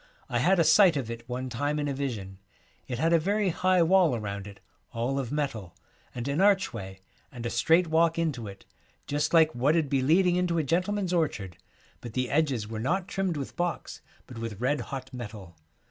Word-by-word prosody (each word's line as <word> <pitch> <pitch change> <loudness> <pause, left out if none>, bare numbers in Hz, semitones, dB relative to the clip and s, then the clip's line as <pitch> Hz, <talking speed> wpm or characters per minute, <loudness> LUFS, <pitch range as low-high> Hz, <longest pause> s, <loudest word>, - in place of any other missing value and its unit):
I 120 - 0
had 185 +10 +3
a 165 - +4
sight 165 +1 +6
of 120 -4 -3
it 115 +1 -9
one 125 +1 -3
time 145 +5 -2
in 145 -1 -1
a 140 - -1
vision. 110 -9 -5 0.5
It 125 - -4
had 165 +5 +2
a 165 - +5
very 200 +4 +1
high 185 +1 +2
wall 175 -5 +4
around 100 -2 -5
it, 100 -1 -12 0.3
all 120 +4 -1
of 125 -4 -4
metal, 135 - -3 0.4
and 120 +1 -4
an 140 +5 0
archway, 115 - +1 0.3
and 120 -2 -8
a 120 - -2
straight 165 +9 +3
walk 165 +1 +2
into 145 -10 -2
it, 100 -1 -11 0.4
just 145 +2 -1
like 160 -2 +5
what 135 +6 +2
'ud 155 -4 0
be 135 -1 +1
leading 175 +6 +3
into 180 -2 0
a 160 - +1
gentleman's 180 +5 0
orchard, 110 - -1 0.4
but 120 -3 -9
the 125 0 -1
edges 140 -8 +1
were 110 0 -5
not 180 - -1
trimmed 190 -4 -2
with 140 - -6
box, 175 -1 -3 0.2
but 120 -3 -10
with 115 -3 -5
red 135 +3 0
hot 130 +1 -7
metal. 105 -8 -8
140 Hz, 205 wpm, -27 LUFS, 115-170 Hz, 0.5 s, sight